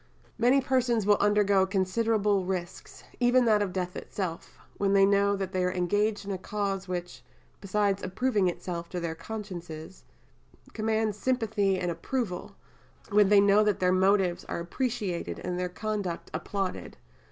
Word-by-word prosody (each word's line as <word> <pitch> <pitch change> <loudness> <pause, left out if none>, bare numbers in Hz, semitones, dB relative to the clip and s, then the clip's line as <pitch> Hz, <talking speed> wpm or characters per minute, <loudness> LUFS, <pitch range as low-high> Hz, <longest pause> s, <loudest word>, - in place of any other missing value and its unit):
Many 250 +4 +4
persons 250 -4 +1
will 205 0 +4
undergo 205 -2 +3
considerable 200 +1 +1
risks, 180 -2 -5 0.2
even 245 0 +4
that 215 -2 +4
of 200 -3 -1
death 180 -1 -3
itself, 180 -5 -5 0.2
when 200 -1 +1
they 195 0 +6
know 200 0 +3
that 195 -2 -4
they 185 -2 0
are 180 - +1
engaged 205 +3 0
in 200 - -4
a 190 - -3
cause 195 -1 -3
which, 175 -7 -5 0.4
besides 200 0 0
approving 205 +1 0
itself 170 -1 -4
to 180 - -4
their 170 -1 -3
consciences, 175 -4 -8 0.7
commands 220 -1 -1
sympathy 220 -6 +1
and 180 -1 -1
approval, 210 -1 -4 0.5
when 205 -2 +4
they 205 -1 +7
know 200 +1 +5
that 210 -2 +1
their 180 0 +3
motives 190 -1 +2
are - - -4
appreciated 205 0 -3
and 180 0 -3
their 180 0 -1
conduct 205 -2 -4
applauded. 190 +3 -4
200 Hz, 155 wpm, -28 LUFS, 180-210 Hz, 0.7 s, they